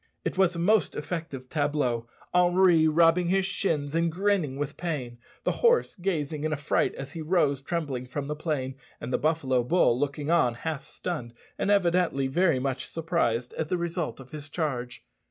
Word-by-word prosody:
It - - -1
was 185 -2 +3
a - - -4
most 195 +2 +2
effective 150 -5 -5
tableau 145 -6 0 0.3
Henri 175 -2 +5
rubbing 165 +2 +4
his 190 +1 +2
shins 155 -7 -1
and 165 0 +1
grinning 185 -6 0
with 145 +1 -3
pain, 135 -9 -4 0.2
the - - +2
horse 480 0 +2
gazing 160 -6 -2
in 155 - 0
affright 150 -1 0
as 135 0 -7
he 165 - -6
rose 155 -5 +2
trembling 135 -5 -3
from 140 +3 -4
the 150 +1 -3
plain, 140 -4 -3 0.2
and 120 +2 -5
the - - +2
buffalo 140 -6 +1
bull 155 -2 +3
looking 145 +2 -1
on 125 -9 +3
half 155 +3 -4
stunned, 135 -10 -5 0.2
and - - -1
evidently 180 -7 +2
very 165 +2 +2
much 130 0 -2
surprised 155 -8 -1
at 160 -1 -1
the 180 - +1
result 170 -3 -3
of 130 -1 -12
his 150 -2 -7
charge. 130 -7 -3
155 Hz, 175 wpm, -27 LUFS, 135-175 Hz, 0.3 s, Henri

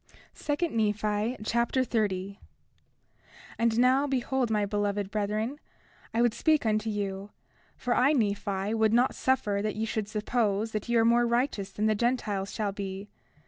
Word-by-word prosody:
2 305 +4 -1
Nephi 215 0 0
Chapter 235 +3 +1
30 200 -5 -2
30:1 - - -32 0.4
And 230 -1 +2
now 260 +3 +4
behold, 265 -2 0
my 210 -2 +1
beloved 205 -1 -1
brethren, 215 +6 -2 0.5
I 230 +1 +2
would 240 -2 +3
speak 305 +3 +2
unto 215 0 +1
you; 200 -1 -3 0.5
for 245 - -1
I, 265 +4 +4
Nephi, 200 -4 -1
would 220 -1 +2
not 245 +2 +3
suffer 255 -6 0
that 215 0 -2
ye 220 +1 -1
should 220 -2 -2
suppose 215 0 0
that 215 +2 -4
ye 235 - +1
are 225 -1 +4
more 240 +1 +4
righteous 235 -5 0
than 210 +2 -2
the 215 - +3
Gentiles 210 -4 -1
shall 210 -3 -2
be. 195 0 -6
220 Hz, 160 wpm, -28 LUFS, 205-240 Hz, 0.5 s, now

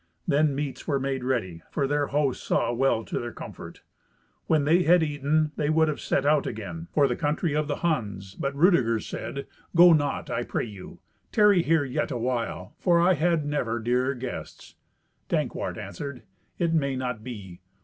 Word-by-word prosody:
Then 145 0 +3
meats 140 -1 -4
were 140 -3 +1
made 135 -1 -2
ready, 100 -10 -2
for 140 - -1
their 145 +1 0
host 140 -3 0
saw - - +1
well 120 -2 +2
to - - -3
their 120 0 -5
comfort. - - -10 0.6
When 155 -3 +3
they 165 +5 +4
had 175 0 +5
eaten, 150 +1 +1
they 150 -1 0
would 160 0 +4
have 150 - -3
set 140 - 0
out 150 -1 +3
again 85 -7 -6
for 145 -2 +4
the 120 - -1
country 150 +3 -1
of 155 -1 0
the 145 - -1
Huns, 100 - -2
but 140 +5 -3
Rudeger 140 - +4
said, 120 +6 -6 0.3
"Go 175 0 +8
not, 145 -3 0
I 115 - 0
pray 120 - -2
you. 100 -5 -11 0.3
Tarry 210 -4 +5
here 165 -3 +2
yet 130 - -2
a - - -2
while, 120 0 -3
for 170 -1 +3
I 175 +2 +5
had 165 -1 +1
never 125 -6 -1
dearer 125 +4 +1
guests." 125 0 -7 0.6
Dankwart - - -1
answered, 140 -5 -7 0.3
"It 170 -1 +1
may 140 -4 +1
not 125 -4 -3
be. 100 -8 -8
140 Hz, 180 wpm, -26 LUFS, 120-155 Hz, 0.6 s, Go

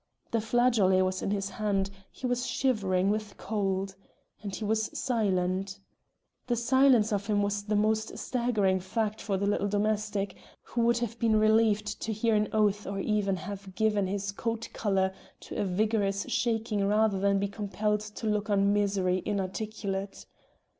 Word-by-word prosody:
The 230 - +1
flageolet 220 -5 +3
was 185 0 -2
in - - -2
his 200 -1 -1
hand; 200 -2 -1 0.2
he - - -8
was 245 0 0
shivering 200 -7 +1
with 215 -1 -3
cold. 195 -2 -2 0.5
And 200 -2 -5
he 215 - -4
was 220 +1 +1
silent. 195 -4 0 0.7
The 240 - +1
silence 240 -2 +4
of 200 0 -2
him 205 -1 +2
was 205 0 -1
the 210 +1 -2
most 215 +1 +1
staggering 220 -7 +1
fact 215 +3 -2
for 195 -3 -1
the 200 - -1
little 205 0 +1
domestic, 205 -1 -1 0.3
who 240 - -2
would 235 0 +3
have 235 -1 -3
been 225 -2 +3
relieved 215 -1 +2
to 225 - -2
hear 220 +1 +1
an 210 0 +2
oath 210 -1 +1
or 195 0 -3
even 200 -1 +1
have 195 0 -8
given 210 -2 +2
his 200 +1 -2
coat 230 +2 -3
collar 190 -3 +1 0.3
to - - -9
a - - +1
vigorous 200 +1 0
shaking 225 -3 0
rather 210 -1 +2
than 200 0 +2
be 200 +1 0
compelled 210 +1 -1
to 210 +1 -8
look 210 0 0
on 200 0 +3
misery 195 -3 +1
inarticulate. 200 0 -3
210 Hz, 165 wpm, -29 LUFS, 195-220 Hz, 0.7 s, silence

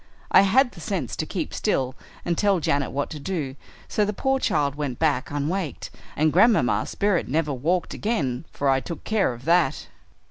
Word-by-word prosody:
I - - +8
had 245 +7 +4
the - - -13
sense - - -3
to - - -2
keep - - -4
still 130 -11 0 0.3
and 170 - 0
tell 200 0 +2
Janet 140 -3 0
what 140 +1 -3
to 150 - -6
do, 145 -4 -3 0.3
so 210 - +1
the 210 +1 -1
poor 265 +5 0
child 145 - +1
went 140 -4 -4
back 145 -5 +1
unwaked, 150 +3 -3 0.2
and 155 0 +2
Grandmamma's 160 - +3
spirit 200 -3 0
never 150 +1 0
walked 165 +7 -1
again 140 - -2
for 140 - -2
I 135 -1 +4
took 160 +5 -7
care 215 -9 +1
of 120 +1 -10
that." 170 0 +2
155 Hz, 185 wpm, -24 LUFS, 140-195 Hz, 0.3 s, I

